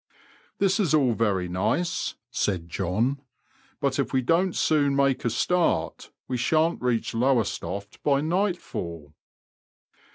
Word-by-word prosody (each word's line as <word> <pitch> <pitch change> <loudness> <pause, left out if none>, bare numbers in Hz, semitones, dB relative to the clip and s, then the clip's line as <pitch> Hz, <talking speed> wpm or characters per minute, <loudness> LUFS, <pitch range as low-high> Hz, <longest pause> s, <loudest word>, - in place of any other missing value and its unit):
This 195 0 +2
is 170 -7 +3
all 135 -6 +3
very 100 -5 0
nice," 120 - -1 0.2
said 90 -5 -1
John, 110 - -1 0.6
but - - 0
if - - 0
we 130 -1 +1
don't 170 +6 +2
soon 145 -3 +2
make 140 -1 +2
a 120 - +1
start 180 +8 0 0.2
we 130 - -2
shan't 160 +7 +1
reach 120 -2 0
Lowestoft 110 -5 -1
by 140 -2 +2
nightfall." 155 - -2
130 Hz, 125 wpm, -26 LUFS, 100-160 Hz, 0.6 s, is